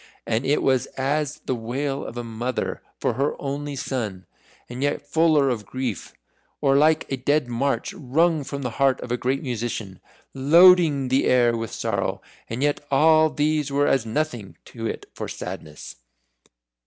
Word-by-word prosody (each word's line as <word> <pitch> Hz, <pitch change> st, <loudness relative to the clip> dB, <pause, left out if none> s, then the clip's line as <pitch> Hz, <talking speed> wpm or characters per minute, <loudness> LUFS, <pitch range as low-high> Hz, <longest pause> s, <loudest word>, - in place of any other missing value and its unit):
And 115 Hz, +3 st, -1 dB
it 145 Hz, -, +2 dB
was 130 Hz, -2 st, +2 dB
as 145 Hz, +2 st, -1 dB
the -, -, 0 dB
wail 135 Hz, +4 st, -3 dB
of 120 Hz, -, -8 dB
a 120 Hz, -, -3 dB
mother 120 Hz, +2 st, -3 dB, 0.2 s
for -, -, 0 dB
her 140 Hz, +3 st, -1 dB
only 145 Hz, +1 st, -4 dB
son, 110 Hz, -9 st, -4 dB, 0.4 s
and 125 Hz, +2 st, -7 dB
yet 145 Hz, 0 st, -1 dB
fuller 155 Hz, -2 st, +3 dB
of 105 Hz, -5 st, -4 dB
grief. 125 Hz, -6 st, -4 dB, 0.4 s
Or 135 Hz, -2 st, +3 dB
like 155 Hz, +2 st, +4 dB
a 135 Hz, -, 0 dB
Dead 145 Hz, +1 st, +1 dB
March 120 Hz, 0 st, -1 dB
wrung 155 Hz, +3 st, +1 dB
from 140 Hz, 0 st, -5 dB
the 125 Hz, -, -2 dB
heart 135 Hz, -1 st, +4 dB
of 120 Hz, -, -6 dB
a -, -, +2 dB
great 130 Hz, +3 st, -1 dB
musician 115 Hz, -6 st, -4 dB, 0.3 s
loading 155 Hz, -1 st, +5 dB
the 130 Hz, +2 st, +2 dB
air 120 Hz, -2 st, +4 dB
with 115 Hz, -1 st, -4 dB
sorrow -, -, -2 dB, 0.3 s
and 115 Hz, +4 st, -3 dB
yet 145 Hz, 0 st, 0 dB
all 155 Hz, +3 st, +5 dB
these 150 Hz, -1 st, 0 dB
were 140 Hz, +1 st, +2 dB
as 135 Hz, -5 st, +2 dB
nothing 115 Hz, -3 st, -3 dB
to 115 Hz, -1 st, -6 dB
it -, -, -5 dB
for -, -, -5 dB
sadness. 75 Hz, -5 st, -8 dB
135 Hz, 165 wpm, -24 LUFS, 120-145 Hz, 0.4 s, loading